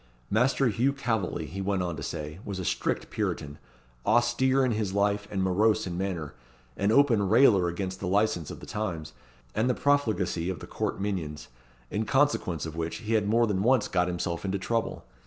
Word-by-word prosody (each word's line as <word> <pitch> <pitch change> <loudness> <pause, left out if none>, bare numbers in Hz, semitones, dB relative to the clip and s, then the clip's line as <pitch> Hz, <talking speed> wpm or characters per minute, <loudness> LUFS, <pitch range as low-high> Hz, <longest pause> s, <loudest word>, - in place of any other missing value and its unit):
Master 125 +5 +3
Hugh 125 +6 +1
Calveley, 115 -8 -2
he 95 +4 -6
went 95 -1 0
on 85 -2 -2
to - - -7
say, 75 +1 -5
was 100 -2 -5
a 95 - -4
strict - - -1
Puritan, 70 0 -3 0.4
austere 120 +4 +3
in 125 - +1
his 105 -3 -1
life, 100 0 +1
and 95 -2 -1
morose 105 +4 +2
in 90 -2 -4
manner; 90 -5 -3 0.4
an 100 +2 +1
open 115 -7 +4
railer 110 -6 +5
against 95 +2 -3
the 95 - -3
licence 95 -4 +1
of - - -8
the - - -8
times, 90 -8 -4 0.4
and 110 +4 +1
the 125 - +2
profligacy 110 -11 +1
of 95 - -3
the - - -8
court - - -3
minions, 85 -9 -3 0.4
in 110 +2 -1
consequence 130 - +1
of 80 -1 -6
which 85 0 -3
he 115 0 -3
had 105 -2 +2
more 115 +3 +4
than 100 -4 0
once 120 0 +3
got 90 -1 +1
himself 85 -1 -3
into 100 0 -1
trouble. 115 +4 -2
100 Hz, 195 wpm, -28 LUFS, 90-115 Hz, 0.4 s, railer